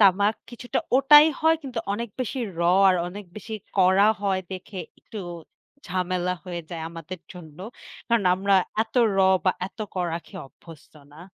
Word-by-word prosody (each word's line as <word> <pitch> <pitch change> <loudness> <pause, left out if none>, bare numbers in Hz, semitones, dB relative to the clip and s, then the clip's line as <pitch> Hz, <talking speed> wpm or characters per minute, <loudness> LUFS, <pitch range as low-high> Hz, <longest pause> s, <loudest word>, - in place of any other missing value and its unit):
তামাক 200 +2 +5 0.2
কিছুটা 245 0 -3 0.2
ওটাই 295 +3 +8
হয় 320 +1 +4
কিন্তু 255 -4 -5
অনেক 235 +3 -3
বেশি 255 +2 -3 0.2
'র' 170 - -2 0.3
আর 185 - +4
অনেক 200 +3 -8
বেশি 215 +1 -7 0.2
কড়া 190 +3 +5
হয় 195 -2 +1
দেখে 185 +1 -8 0.2
একটু 220 - -9 0.7
ঝামেলা 180 0 -1
হয়ে 175 -2 -5
যায় 165 -2 -5
আমাদের 165 +1 -8
জন্য। 165 -4 -12 0.5
কারণ 230 -4 +1
আমরা 195 +1 +1 0.3
এত 225 - -14 0.2
'র' 195 - +2 0.2
বা 185 - +4
এত 200 - -16 0.2
কড়া 175 -3 -1
খেয়ে 190 - -9
অভ্যস্ত 155 +2 -16 0.2
না। 155 - -14
190 Hz, 160 wpm, -25 LUFS, 180-220 Hz, 0.7 s, ওটাই